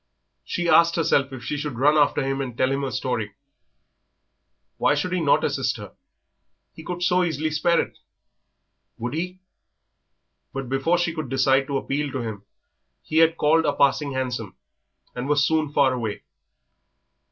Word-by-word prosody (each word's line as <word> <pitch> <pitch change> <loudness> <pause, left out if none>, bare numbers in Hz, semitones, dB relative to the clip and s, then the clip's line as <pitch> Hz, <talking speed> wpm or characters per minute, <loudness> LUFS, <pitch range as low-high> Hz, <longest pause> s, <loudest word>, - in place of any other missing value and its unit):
She 175 -2 -3
asked 170 0 +5
herself 140 -4 +2
if 130 -3 -8
she 145 +5 -3
should 145 -4 -4
run 145 +4 +4
after 145 -1 +3
him 135 0 -1
and 125 -3 -6
tell 130 +1 +2
him 135 +1 -1
her 135 - -2
story. 115 -4 -3 1.4
Why 150 - +3
should 180 +5 -2
he 180 - 0
not 145 -3 +3
assist - - 0
her? - - -10 0.8
He 160 - -11
could 180 +1 -4
so 180 0 +3
easily 155 -2 -1
spare 170 +3 +2
it. - - -4 1.0
Would 120 +2 -4
he? 180 +3 -4 1.1
But 135 -2 -5
before 135 +6 +1
she 175 -1 0
could 155 -5 -5
decide 135 0 +2
to 140 - -1
appeal 140 +1 -2
to 130 - -2
him 105 -3 -6 0.6
he 155 - -3
had 165 0 +4
called 160 +2 +3
a 145 - +2
passing 140 0 +2
hansom 125 -6 -3 0.6
and 125 +3 -5
was 150 0 +3
soon 155 -1 +1
far 140 -3 +3
away. 110 -5 -4
145 Hz, 165 wpm, -24 LUFS, 130-160 Hz, 1.4 s, asked